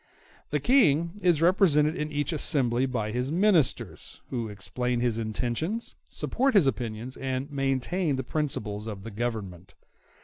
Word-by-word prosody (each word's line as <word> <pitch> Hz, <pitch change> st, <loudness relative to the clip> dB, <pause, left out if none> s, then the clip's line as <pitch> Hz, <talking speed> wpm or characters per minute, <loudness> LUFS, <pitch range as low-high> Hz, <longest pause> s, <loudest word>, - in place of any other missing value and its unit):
The 150 Hz, -, 0 dB
King 170 Hz, -, +3 dB
is 175 Hz, -4 st, +3 dB
represented 160 Hz, -4 st, +4 dB
in 150 Hz, 0 st, -3 dB
each 145 Hz, +1 st, -1 dB
assembly 130 Hz, -5 st, +2 dB
by 110 Hz, -4 st, -2 dB
his 125 Hz, +4 st, -2 dB
ministers, 175 Hz, -5 st, +1 dB
who 120 Hz, -3 st, -2 dB
explain 120 Hz, +5 st, -2 dB
his 120 Hz, -2 st, 0 dB
intentions, 125 Hz, -, -2 dB
support 265 Hz, 0 st, 0 dB
his 190 Hz, -7 st, +6 dB
opinions, 120 Hz, -1 st, -3 dB
and 135 Hz, +2 st, -3 dB
maintain 140 Hz, +4 st, 0 dB
the 130 Hz, -, -3 dB
principles 115 Hz, -8 st, -3 dB
of 100 Hz, -3 st, -6 dB
the 115 Hz, -, -7 dB
Government. 100 Hz, -5 st, -5 dB
135 Hz, 140 wpm, -27 LUFS, 115-160 Hz, -, his